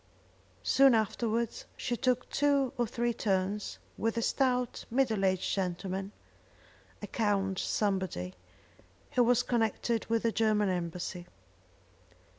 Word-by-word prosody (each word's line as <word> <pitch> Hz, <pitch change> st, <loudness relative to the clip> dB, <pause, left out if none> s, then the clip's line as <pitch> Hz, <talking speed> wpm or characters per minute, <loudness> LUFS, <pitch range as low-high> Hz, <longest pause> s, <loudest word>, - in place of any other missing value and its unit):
Soon 270 Hz, -2 st, +6 dB
afterwards 225 Hz, +1 st, -1 dB
she 245 Hz, -, -1 dB
took 250 Hz, 0 st, 0 dB
two 280 Hz, -3 st, +2 dB
or 240 Hz, -1 st, 0 dB
three 240 Hz, 0 st, -1 dB
turns 200 Hz, -1 st, -1 dB, 0.2 s
with 225 Hz, +1 st, 0 dB
a 230 Hz, -, +1 dB
stout 250 Hz, -2 st, +1 dB
middle 230 Hz, -5 st, +1 dB
aged 185 Hz, -1 st, +1 dB
gentleman, 190 Hz, +1 st, -2 dB, 0.9 s
a -, -, -1 dB
Count 195 Hz, -4 st, 0 dB
somebody, 190 Hz, -, -1 dB, 0.8 s
who 250 Hz, -, +4 dB
was 245 Hz, +1 st, +3 dB
connected 230 Hz, -1 st, 0 dB
with 230 Hz, 0 st, +1 dB
the 230 Hz, -, +2 dB
German 215 Hz, -2 st, +2 dB
embassy. 175 Hz, 0 st, -3 dB
220 Hz, 115 wpm, -31 LUFS, 195-240 Hz, 0.9 s, Soon